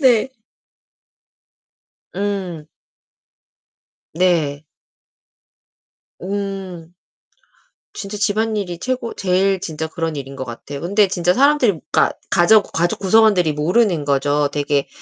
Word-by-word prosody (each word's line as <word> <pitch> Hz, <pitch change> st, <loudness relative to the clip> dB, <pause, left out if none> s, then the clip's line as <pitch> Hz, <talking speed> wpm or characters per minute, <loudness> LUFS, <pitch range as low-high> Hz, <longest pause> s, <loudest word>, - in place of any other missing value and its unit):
네. 255 Hz, -3 st, +4 dB, 1.9 s
음. 190 Hz, -6 st, -3 dB, 1.5 s
네. 160 Hz, -4 st, +1 dB, 1.6 s
음. 190 Hz, -3 st, -5 dB, 1.0 s
진짜 200 Hz, +1 st, -6 dB
집안일이 205 Hz, -4 st, -1 dB
최고 255 Hz, -1 st, -3 dB
제일 190 Hz, 0 st, +1 dB
진짜 160 Hz, -2 st, -4 dB
그런 160 Hz, -1 st, -4 dB
일인 135 Hz, -1 st, -7 dB
것 130 Hz, -, -5 dB
같아요. 135 Hz, +4 st, -8 dB
근데 200 Hz, +5 st, +2 dB
진짜 180 Hz, -2 st, +1 dB
사람들이 260 Hz, -, +3 dB
그러니까 -, -, +3 dB, 0.2 s
가족 200 Hz, +4 st, +4 dB
가족 170 Hz, +2 st, 0 dB
구성원들이 200 Hz, -5 st, +4 dB
모르는 170 Hz, +2 st, +1 dB
거죠. 145 Hz, +1 st, +1 dB
되게 145 Hz, -1 st, 0 dB
180 Hz, 210 characters per minute, -19 LUFS, 155-205 Hz, 1.9 s, 네